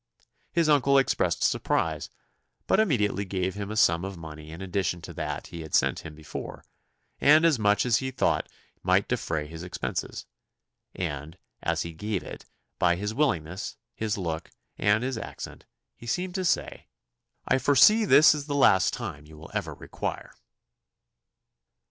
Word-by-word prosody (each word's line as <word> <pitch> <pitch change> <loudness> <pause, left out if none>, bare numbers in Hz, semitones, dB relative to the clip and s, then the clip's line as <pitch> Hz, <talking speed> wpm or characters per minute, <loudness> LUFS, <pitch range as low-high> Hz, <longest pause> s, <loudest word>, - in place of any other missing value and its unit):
His 170 -2 +2
uncle 140 -2 +4
expressed 135 - +1
surprise, - - 0 0.6
but - - +3
immediately 105 - +1
gave 95 -1 -2
him 100 0 -5
a 110 - -4
sum 85 -5 +4
of 95 -1 -5
money 80 -1 -9
in 80 +2 -9
addition 95 -2 -2
to - - -8
that - - -4
he 85 - -6
had 80 - -3
sent - - +2
him 80 -2 -9
before, 75 0 -8 0.5
and 155 +3 +6
as 155 -7 +4
much 105 0 +3
as 120 -3 +3
he 130 - -2
thought 130 - 0 0.3
might - - +2
defray 80 -2 -2
his 80 +2 -9
expenses; 90 0 -4 0.7
and, 80 -1 -4 0.2
as - - 0
he 85 - -7
gave 105 +3 -3
it, - - -9 0.3
by 85 -1 +3
his 105 +4 -3
willingness, 90 - -1 0.2
his 110 -2 -2
look, 85 -3 -4 0.3
and 105 +3 +2
his 130 -3 -2
accent, - - -8 0.3
he 120 - -12
seemed 180 +8 -2
to 185 -1 -2
say, - - -1 0.6
"I 130 - +3
foresee 145 - +6
this 155 -7 +7
is 145 -1 -5
the 145 - -2
last 95 -9 +4
you 75 +1 -7
will 80 - -12
ever - - -3
require." - - -5
100 Hz, 160 wpm, -27 LUFS, 85-135 Hz, 0.7 s, this